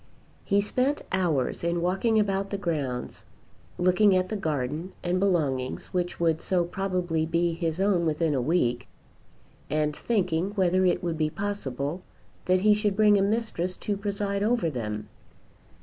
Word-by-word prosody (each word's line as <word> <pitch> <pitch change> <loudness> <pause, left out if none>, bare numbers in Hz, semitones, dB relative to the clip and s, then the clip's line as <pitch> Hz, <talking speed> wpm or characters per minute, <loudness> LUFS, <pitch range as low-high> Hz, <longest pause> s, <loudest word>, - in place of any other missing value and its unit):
He 200 0 +2
spent 255 +7 0
hours 170 -10 0
in 170 0 0
walking 195 +6 +1
about 195 -1 0
the 200 - -2
grounds, 145 -10 -3 0.5
looking 185 +3 +4
at 185 0 +1
the 215 - -2
garden 155 -1 -3
and 180 +1 0
belongings 150 -10 0
which 175 -1 -2
would 165 -2 +1
so 180 -2 +1
probably 180 -3 -1
be 170 +1 +1
his 165 0 -2
own 190 -4 +2
within 155 0 +1
a 130 - +1
week, 125 -5 0 0.8
and 150 -1 0
thinking 190 -3 0
whether 185 -1 +2
it 180 - +1
would 165 -2 -2
be 155 -1 +2
possible 165 -5 -3 0.4
that 185 0 +3
he 210 +1 +5
should 210 -1 0
bring 210 0 +5
a - - +2
mistress 200 -4 -1
to 205 - -2
preside 200 0 -2
over 220 -6 +1
them. 105 -5 -4
180 Hz, 155 wpm, -27 LUFS, 160-200 Hz, 0.8 s, he